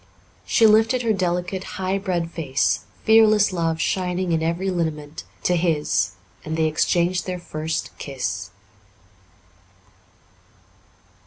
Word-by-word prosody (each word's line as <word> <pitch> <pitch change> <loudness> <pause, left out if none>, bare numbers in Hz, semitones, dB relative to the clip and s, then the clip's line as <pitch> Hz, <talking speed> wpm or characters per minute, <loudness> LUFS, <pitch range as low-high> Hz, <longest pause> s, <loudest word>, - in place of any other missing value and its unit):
She 225 - +4
lifted 225 +4 +4
her 225 -2 +2
delicate, 180 0 -1
high 190 +1 -1
bred 175 -3 -2
face, 140 -6 0 0.2
fearless 215 -3 +5
love 165 -2 -1
shining 180 0 -1
in 165 -1 +1
every 170 +4 -1
lineament, 155 -4 -3 0.2
to 180 - +2
his, 160 - +1 0.3
and 160 +1 -4
they 160 - +2
exchanged 175 +3 +1
their 180 -1 -2
first 160 -2 -4
kiss. 115 -8 -4
175 Hz, 110 wpm, -22 LUFS, 160-190 Hz, 0.3 s, fearless